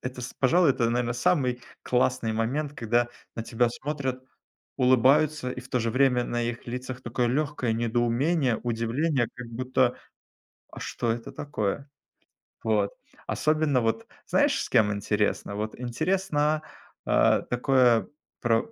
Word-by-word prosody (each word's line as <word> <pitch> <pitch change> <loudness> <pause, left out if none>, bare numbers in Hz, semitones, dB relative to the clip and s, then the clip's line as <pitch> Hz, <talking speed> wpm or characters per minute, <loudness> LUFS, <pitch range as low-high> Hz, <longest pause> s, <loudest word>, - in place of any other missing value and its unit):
это, 125 0 -6
с 125 - -6
пожалуй, 165 +4 +4
это, 120 -3 +1
наверно, 120 0 0
самый 125 -2 +1 0.2
классный 125 -2 +1
момент, 135 +7 -1
когда 120 -2 +1 0.3
на 115 - -4
тебя 115 +1 +1
смотрят, 130 0 -4 0.5
улыбаются 130 +2 +3
и 125 - -6
в 125 - -14
то 125 - 0
же 115 0 0
время 130 -2 +3
на 120 0 -2
их 115 0 -4
лицах 125 +1 -5
такое 120 0 -1
легкое 140 -3 0
недоумение, 120 +4 +1
удивление, 120 +4 0
как 125 -1 -8
будто: 125 +1 0 0.7
"А - - -10
что 115 - -2
это 115 0 -6
такое?" 140 -1 -3 0.8
Вот, 105 -2 +1 0.4
особенно 155 -4 +1
вот 115 - -1 0.2
знаешь, 290 -1 +2
с - - -6
кем 110 -4 +4
интересно? 105 0 -1
Вот 110 +3 -4
интересно, 155 +3 0 0.4
а, - - +4
такое 125 -2 +3 0.3
про 120 - +1
125 Hz, 140 wpm, -27 LUFS, 115-140 Hz, 0.8 s, пожалуй